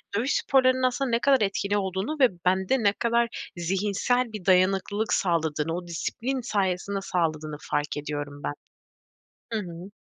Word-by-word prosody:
dövüş 245 Hz, +7 st, +1 dB
sporlarının 260 Hz, -1 st, +3 dB
aslında 255 Hz, +1 st, +1 dB
ne 230 Hz, -, +3 dB
kadar 270 Hz, -1 st, +4 dB
etkili 200 Hz, 0 st, 0 dB
olduğunu 190 Hz, -, -2 dB
ve 260 Hz, -, +7 dB, 0.2 s
bende 190 Hz, +7 st, +2 dB
ne 200 Hz, -1 st, +4 dB
kadar 235 Hz, +1 st, -1 dB
zihinsel 205 Hz, +7 st, 0 dB
bir 205 Hz, -4 st, -7 dB
dayanıklılık 195 Hz, +3 st, +2 dB
sağladığını, 165 Hz, -3 st, 0 dB
o 175 Hz, 0 st, -6 dB
disiplin 245 Hz, +10 st, -3 dB
sayesinde 195 Hz, -3 st, -1 dB
sağladığını 155 Hz, -5 st, -1 dB
fark 150 Hz, 0 st, -2 dB
ediyorum 145 Hz, -1 st, -5 dB
ben. -, -, -2 dB, 1.0 s
Hı 220 Hz, -, +1 dB
hı. 175 Hz, -1 st, -8 dB
195 Hz, 145 wpm, -26 LUFS, 170-235 Hz, 1.0 s, ve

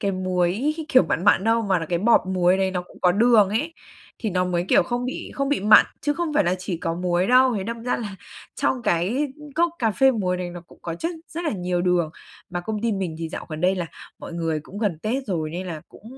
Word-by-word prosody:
cái 200 Hz, -1 st, 0 dB
muối 185 Hz, -, 0 dB
kiểu 255 Hz, -, +6 dB
mặn 170 Hz, +1 st, -2 dB
mặn 205 Hz, -2 st, +4 dB
đâu, 230 Hz, +1 st, +3 dB
mà 190 Hz, -4 st, +1 dB
là 165 Hz, -, -5 dB
cái 170 Hz, +1 st, 0 dB
bọt 230 Hz, +6 st, +5 dB
muối 185 Hz, 0 st, +3 dB
đấy 190 Hz, -1 st, +1 dB
nó 180 Hz, -1 st, -2 dB
cũng 180 Hz, -, -18 dB
có 180 Hz, -1 st, +4 dB
đường 220 Hz, -1 st, +5 dB
ấy, 260 Hz, -, -1 dB, 0.5 s
thì 220 Hz, -, -2 dB
nó 180 Hz, 0 st, +1 dB
mới, 175 Hz, -1 st, -1 dB
kiểu, -, -, +5 dB
không 245 Hz, 0 st, -3 dB
bị 255 Hz, -, -5 dB
không 275 Hz, 0 st, -1 dB
bị 290 Hz, -, +1 dB
mặn, 210 Hz, +2 st, +7 dB
chứ 290 Hz, +1 st, 0 dB
không 340 Hz, -1 st, -2 dB
phải -, -, +3 dB
là 175 Hz, +1 st, +2 dB
chỉ 180 Hz, -1 st, -4 dB
có 165 Hz, 0 st, -3 dB
muối 180 Hz, +1 st, 0 dB
đâu. 255 Hz, +1 st, +5 dB
Thế 190 Hz, -, -3 dB
đâm 230 Hz, +2 st, -5 dB
ra 250 Hz, -, 0 dB
là 205 Hz, -4 st, -6 dB, 0.4 s
trong 255 Hz, -2 st, 0 dB
cái 230 Hz, -, 0 dB, 0.2 s
cốc 340 Hz, +1 st, +2 dB
cà 225 Hz, -2 st, +2 dB
phê 265 Hz, +5 st, +4 dB
muối 190 Hz, -7 st, -1 dB
đấy, 180 Hz, -1 st, -4 dB
nó 175 Hz, 0 st, -8 dB
cũng -, -, -18 dB
có 165 Hz, -, -4 dB
chất 330 Hz, -, -3 dB, 0.2 s
rất 340 Hz, +2 st, -5 dB
là 315 Hz, -, +1 dB
nhiều 180 Hz, -3 st, -1 dB
đường, 175 Hz, -3 st, +1 dB, 0.4 s
mà 175 Hz, 0 st, -3 dB
công 210 Hz, +3 st, -4 dB
ty 230 Hz, -1 st, +1 dB
mình 185 Hz, -5 st, -3 dB
thì 165 Hz, -, -4 dB
dạo -, -, -7 dB
gần 155 Hz, -1 st, -6 dB
đây 185 Hz, +2 st, +3 dB
là 180 Hz, -3 st, -3 dB, 0.3 s
mọi -, -, -9 dB
người 165 Hz, -2 st, -2 dB
cũng 190 Hz, +7 st, -10 dB
gần 205 Hz, -7 st, -1 dB
Tết 250 Hz, -, -2 dB
rồi, 160 Hz, -6 st, -2 dB
nên 180 Hz, +3 st, -5 dB
là 165 Hz, -4 st, -5 dB
cũng -, -, -17 dB
190 Hz, 265 wpm, -23 LUFS, 175-235 Hz, 0.5 s, mặn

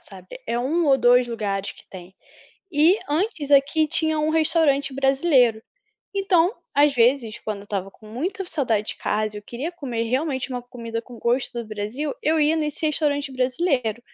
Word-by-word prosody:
sabe? -, -, -12 dB
É 235 Hz, -, -1 dB
1 305 Hz, +8 st, 0 dB
ou 275 Hz, -2 st, +5 dB
2 245 Hz, 0 st, +4 dB
lugares 205 Hz, -4 st, -3 dB
que -, -, -19 dB
tem. 185 Hz, 0 st, -11 dB, 0.6 s
E 330 Hz, +6 st, +4 dB
antes 310 Hz, -2 st, -1 dB
aqui 290 Hz, +3 st, +4 dB
tinha 315 Hz, 0 st, 0 dB
um 305 Hz, +1 st, +1 dB
restaurante 310 Hz, -3 st, +2 dB
brasileiro. 270 Hz, -4 st, +3 dB, 0.5 s
Então, 385 Hz, -1 st, +2 dB, 0.2 s
às 285 Hz, 0 st, +4 dB
vezes 235 Hz, -2 st, +2 dB
quando 215 Hz, -2 st, -4 dB
eu -, -, -12 dB
estava 195 Hz, -2 st, -4 dB
com 215 Hz, -, -18 dB
muita 335 Hz, -, -4 dB
saudade 235 Hz, -, -1 dB, 0.4 s
eu 210 Hz, -, -7 dB
queria 255 Hz, +10 st, -5 dB
comer 250 Hz, -9 st, -3 dB
realmente 260 Hz, +3 st, -1 dB
uma 250 Hz, -2 st, -4 dB
comida 230 Hz, -2 st, -6 dB
com 240 Hz, -1 st, -13 dB
gosto 245 Hz, +3 st, 0 dB
do 235 Hz, -, -8 dB
Brasil, 215 Hz, +8 st, -4 dB
eu 315 Hz, +1 st, +2 dB
ia 305 Hz, +1 st, +3 dB
nesse 310 Hz, 0 st, -2 dB
restaurante 290 Hz, -2 st, 0 dB
brasileiro. 255 Hz, -, 0 dB
270 Hz, 165 wpm, -23 LUFS, 235-310 Hz, 0.6 s, ou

